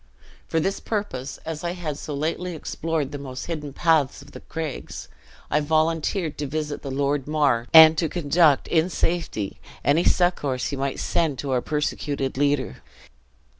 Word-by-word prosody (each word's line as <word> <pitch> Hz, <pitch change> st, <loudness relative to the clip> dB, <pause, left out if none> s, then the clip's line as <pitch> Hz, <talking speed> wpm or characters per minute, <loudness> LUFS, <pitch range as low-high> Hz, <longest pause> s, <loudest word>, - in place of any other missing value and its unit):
For 165 Hz, -, +1 dB
this 195 Hz, +5 st, -1 dB
purpose, 175 Hz, -, -4 dB
as 160 Hz, 0 st, -5 dB
I 170 Hz, 0 st, -1 dB
had 165 Hz, -5 st, -4 dB
so 150 Hz, 0 st, -6 dB
lately 165 Hz, +4 st, -2 dB
explored 160 Hz, -2 st, -3 dB
the 145 Hz, -, -5 dB
most 130 Hz, -2 st, -6 dB
hidden 150 Hz, -4 st, -4 dB
paths 155 Hz, -2 st, +1 dB
of -, -, -16 dB
the -, -, -9 dB
craigs, 160 Hz, -4 st, -6 dB, 0.4 s
I 150 Hz, -, +3 dB
volunteered 160 Hz, +2 st, 0 dB
to 145 Hz, -, -2 dB
visit 150 Hz, 0 st, -3 dB
the 140 Hz, -, -6 dB
Lord 140 Hz, +1 st, -1 dB
Mar, 145 Hz, -6 st, +2 dB
and 160 Hz, 0 st, +10 dB
to 165 Hz, -, 0 dB
conduct, 155 Hz, -2 st, +3 dB
in 165 Hz, +2 st, +2 dB
safety, 165 Hz, -, -2 dB, 0.3 s
any 150 Hz, +4 st, +4 dB
succors 145 Hz, -8 st, +1 dB
he 140 Hz, -, -3 dB
might 135 Hz, 0 st, -2 dB
send 155 Hz, -5 st, 0 dB
to 140 Hz, 0 st, -4 dB
our 125 Hz, -1 st, +2 dB
persecuted 145 Hz, -2 st, -2 dB
leader." 140 Hz, -, 0 dB
150 Hz, 165 wpm, -24 LUFS, 140-165 Hz, 0.4 s, and